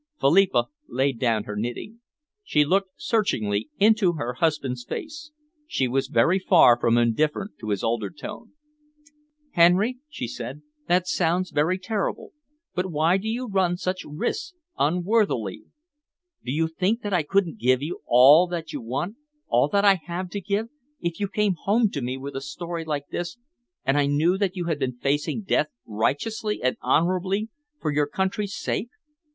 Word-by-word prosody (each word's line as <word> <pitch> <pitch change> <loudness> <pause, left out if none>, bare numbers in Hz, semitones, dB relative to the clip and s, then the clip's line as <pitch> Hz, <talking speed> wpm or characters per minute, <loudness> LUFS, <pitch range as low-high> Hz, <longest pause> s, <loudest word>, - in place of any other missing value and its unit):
Philippa 190 +7 +4 0.2
laid 135 -2 0
down 115 -4 +1
her 105 - -6
knitting. 120 - -5 0.4
She 150 - +2
looked 190 +4 +1
searchingly 110 - 0
into 210 -3 +4
her 125 -6 -3
husband's 135 -4 -1
face. 300 - -7 0.4
She 130 - 0
was 135 +2 0
very 135 +10 +3
far 165 -10 +6
from 115 0 +3
indifferent 150 - +1
to 110 - -6
his 100 -2 -1
altered 115 0 -2
tone. 210 +9 -8 1.0
"Henry," 190 +9 +4
she 125 - -5
said, 125 +6 -7 0.2
"that 180 +1 +2
sounds 180 +1 0
very 160 +6 +1
terrible, 205 +1 -3 0.4
but 180 +1 -1
why 160 +4 +3
do 200 +3 -5
you 245 +3 -2
run 190 -4 +1
such 185 +1 -3
risks 170 - -4 0.2
unworthily? 175 - 0 0.8
Do 125 - -4
you 160 +3 +1
think 185 +8 -1
that 205 -1 -3
I 180 - +3
couldn't 195 +5 0
give 130 -3 +2
you 165 +4 -4
all 140 +8 +7
that 165 -3 -5
you 145 - -4
want, 135 - -3 0.3
all - - +4
that 200 0 +2
I 195 -2 +6
have 175 +1 -4
to 200 - -4
give, 205 +5 -1 0.3
if 170 -1 -3
you 200 - 0
came 210 -1 +1
home 210 +4 +1
to 140 - -3
me 125 +2 -3
with 140 +1 -7
a 135 - -3
story 170 +3 -5
like 145 -3 -4
this 175 +5 -4 0.5
and 135 +2 +3
I 140 - +2
knew 155 +6 +2
that 195 -2 0
you 180 -2 -3
had 160 -3 -1
been 130 -3 -2
facing 145 - -1
death 155 -5 +1 0.2
righteously 210 - -1
and 130 - +2
honourably 185 +5 +1 0.3
for 155 - -1
your 145 0 +1
country's 190 +5 -2
sake? 230 - -2
170 Hz, 170 wpm, -25 LUFS, 135-195 Hz, 1.0 s, all